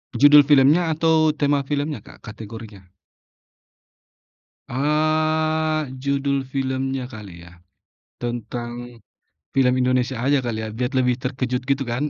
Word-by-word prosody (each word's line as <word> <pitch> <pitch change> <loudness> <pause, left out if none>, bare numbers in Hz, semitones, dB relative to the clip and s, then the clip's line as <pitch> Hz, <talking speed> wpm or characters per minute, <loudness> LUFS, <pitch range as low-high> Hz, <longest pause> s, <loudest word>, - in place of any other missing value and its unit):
Judul 145 +2 +7
filmnya 150 +4 +5
atau, 160 -1 +2
tema 145 -2 0
filmnya, 145 -3 -2
Kak, - - -17
kategorinya? 105 -2 -10 1.8
Eee, 155 +2 0 0.2
judul 140 0 0 0.2
filmnya 135 -1 -2
kali 105 -6 -10 0.2
ya. - - -14 0.7
Tentang 120 0 -5 0.6
film 125 -2 +4
Indonesia 125 +1 +1
aja 140 +1 +3
kali 115 -3 -3
ya, 110 - -4
biar 125 +4 -3
lebih 125 -1 +2
terkejut 125 -1 -2
gitu 140 0 +1
kan. 120 +5 -1
135 Hz, 115 wpm, -22 LUFS, 120-145 Hz, 1.8 s, Judul